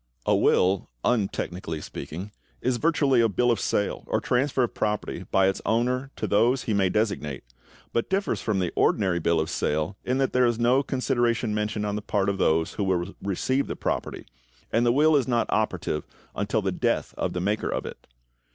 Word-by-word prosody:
= - - -39
A - - +3
will, 95 +1 +2 0.2
untechnically 95 -7 -1
speaking, 95 +7 -7 0.3
is 125 0 0
virtually 140 -5 +3
a 115 - +3
bill 120 +5 +2
of 115 - 0
sale 100 - -1
or - - +1
transfer 130 +1 +1
of 120 - -2
property 105 0 -2
by 95 0 +4
its 95 - -1
owner 125 +4 0
to - - -3
those 120 +5 +2
he 110 - -1
may 95 -2 +2
designate, 95 - -1 0.5
but 115 - 0
differs 195 +2 0
from 110 -3 0
the 90 -2 -1
ordinary 95 -4 +2
bill 85 0 +2
of 80 - 0
sale 80 +7 -1
in 125 +1 0
that 135 -1 0
there 125 -1 +4
is 120 -1 0
no 120 +3 +3
consideration 120 -4 0
mentioned 105 0 -1
on 105 0 -2
the 105 - -3
part 100 -2 0
of 100 - -2
those 80 +1 +2
who 105 - -2
will 95 0 -1
receive 130 +8 0
the - - -4
property, - - -3 0.5
and 120 +1 +2
the - - +5
will 150 +4 +4
is 135 -3 +2
not 120 -2 +2
operative 90 -7 -1 0.3
until - - -1
the - - 0
death - - -1
of - - -2
the 90 - -2
maker 105 +4 -1
of - - -2
it. - - -9
110 Hz, 200 wpm, -26 LUFS, 95-125 Hz, 0.5 s, the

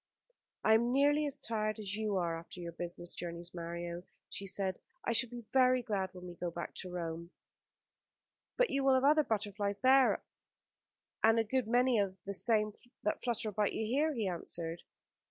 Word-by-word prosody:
"I 220 - +5
am 235 +2 +3
nearly 290 +3 +3
as 285 0 +1
tired 215 -1 0
as 205 -2 -1
you 215 -2 -1
are 170 -2 -1
after 170 +2 -10
your 170 -1 -5
business 175 +1 -4
journeys, 170 0 -6
Mario," 170 0 -5 0.3
she 195 - -4
said. 190 -1 +1 0.3
"I - - +1
shall 235 +1 +3
be 240 -1 -8
very 255 -1 +4
glad 200 -5 -1
when 180 -1 -10
we 175 - -7
can 175 0 -4
go - - -1
back 170 0 -6
to 185 - -4
Rome." 170 -1 -5 1.3
"But - - +3
you 275 0 +1
will 270 -1 +5
have 260 - +2
other 305 +2 +5
butterflies 205 -3 -1
there, 260 0 +5 1.0
and 225 +1 +6
a 225 - +4
good 250 +1 -1
many 245 0 +3
of 195 -2 -1
the 200 - -3
same 215 0 +2 0.3
that 210 - -1
flutter 235 -3 -1
about 210 0 0
you 220 - -2
here," 285 +8 +1
he 220 -4 -1
answered. 170 -1 -2
210 Hz, 190 wpm, -33 LUFS, 175-245 Hz, 1.3 s, and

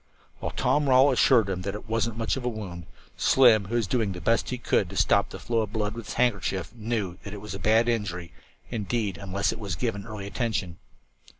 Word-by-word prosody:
While - - -3
Tom 145 -1 +1
Rawle 130 +2 +6
assured 125 -4 +4
him 95 -2 -3
that 100 +2 -4
it 105 - -9
"wasn't 115 0 -1
much 115 -1 0
of 135 - -5
a 125 - 0
wound," 95 -7 -7 0.3
Slim, 115 -6 +5
who 115 +5 -4
was 115 -2 +2
doing 105 -1 0
the 90 - -7
best 115 +7 +1
he 125 - -2
could 120 - +1
to - - -7
stop - - +3
the - - -8
flow 115 -1 -1
of 105 -2 -4
blood 105 -2 -1
with 115 -1 -7
his - - -6
handkerchief, 100 -6 0
knew 110 -6 -3
that 100 +1 -8
it - - -7
was 105 +1 -7
a - - -6
bad 110 +2 +3
injury, 100 -7 -2 0.4
indeed, 105 -3 -2
unless 100 0 -1
it - - -7
was 100 -5 -3
given 105 +3 -3
early 105 -3 -6
attention. 100 -5 -3
110 Hz, 225 wpm, -26 LUFS, 100-115 Hz, 0.4 s, Rawle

